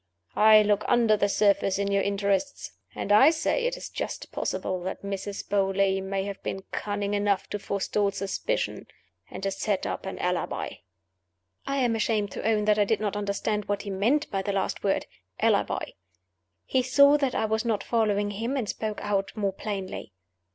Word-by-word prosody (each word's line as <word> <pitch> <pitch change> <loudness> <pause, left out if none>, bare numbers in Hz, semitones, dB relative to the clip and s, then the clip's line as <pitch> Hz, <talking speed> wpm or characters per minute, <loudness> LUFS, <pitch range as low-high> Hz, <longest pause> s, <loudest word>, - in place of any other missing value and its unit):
I 215 0 +7
look 205 0 +2
under 235 -3 +4
the 200 -1 +1
surface, 200 -2 +2
in 200 0 -1
your 200 0 +3
interests; 200 +6 -1 0.2
and 205 - -3
I 210 +8 +8
say, 330 +9 0
it - - -3
is - - -7
just - - -5
possible 185 -1 -2
that 190 +2 -5
Mrs. 200 0 -5
Beauly 195 -1 +1
may 190 0 -2
have 200 0 -6
been 190 - -4
cunning 205 -1 -2
enough 205 -1 +1
to 210 - -2
forestall 200 +1 0
suspicion, 200 - -3 0.4
and - - -8
to 195 - 0
set 200 0 -1
up - - -4
an - - -5
Alibi." - - -2 0.9
I 275 - -1
am 245 -4 +2
ashamed 215 -2 0
to - - -6
own 215 -1 +2
that 210 0 +3
I - - +6
did 215 +1 +1
not 210 -2 -2
understand 205 +1 -1
what 205 0 -2
he 200 - -5
meant 235 +11 +1
by 195 -2 0
the 200 +1 -2
last 195 -1 -2
word 195 - +1 0.3
Alibi. - - +1 0.7
He 260 - +2
saw 280 +3 +6
that 275 -3 0
I - - +1
was 220 0 0
not 220 -4 0
following 205 -3 +1
him, 230 +7 -2
and 240 -5 -2
spoke 215 +1 -3
out 200 -1 0
more 200 -3 -1
plainly. 195 - -5
205 Hz, 185 wpm, -27 LUFS, 200-220 Hz, 0.9 s, I